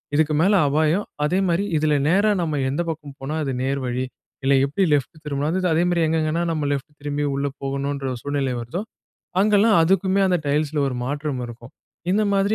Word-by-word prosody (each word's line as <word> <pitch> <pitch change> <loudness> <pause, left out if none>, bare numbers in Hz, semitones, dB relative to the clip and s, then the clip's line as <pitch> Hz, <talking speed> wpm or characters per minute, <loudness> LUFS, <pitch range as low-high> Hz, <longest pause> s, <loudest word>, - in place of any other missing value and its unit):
இதுக்கு 155 0 +2
மேல 195 +5 +4
அபாயம் 155 +7 +2 0.2
அதே 180 +6 +2
மாதிரி 170 +3 +1
இதுல 150 0 +2 0.2
நேரா 200 +4 +4
நாம 155 -4 -1
எந்த 145 +6 -1
பக்கம் 150 -3 -6
போனா 140 +4 -4
அது 135 - -2
நேர் 135 +1 0
வழி 125 +1 -1 0.4
இல்ல 135 - +3
எப்டி 150 +8 0
லெஃப்ட் 145 +3 0
திரும்புனா 145 0 -1 0.2
அதே 165 +2 +3
மாதிரி 175 -1 +1
எங்கெங்கேன்னா 160 +1 0
நாம 155 -3 -1
லெஃப்ட் 140 +1 -3
திரும்பி 145 0 -2
உள்ளே 140 0 -1
போகணுன்ற 140 0 -2
சூழ்நிலை 140 -2 -1
வருதோ 120 - -4 0.6
அங்கெல்லாம் 210 +1 +4
அதுக்குமே 190 +3 +2
அந்த 180 -1 +3
டைல்ஸ்‌ல 150 +1 0
ஒரு 125 - -3
மாற்றம் 145 0 -3
இருக்கும். 120 +1 -11 0.4
இந்த 215 +2 +3
மாதிரி 200 +2 +2
150 Hz, 175 wpm, -22 LUFS, 140-175 Hz, 0.6 s, மேல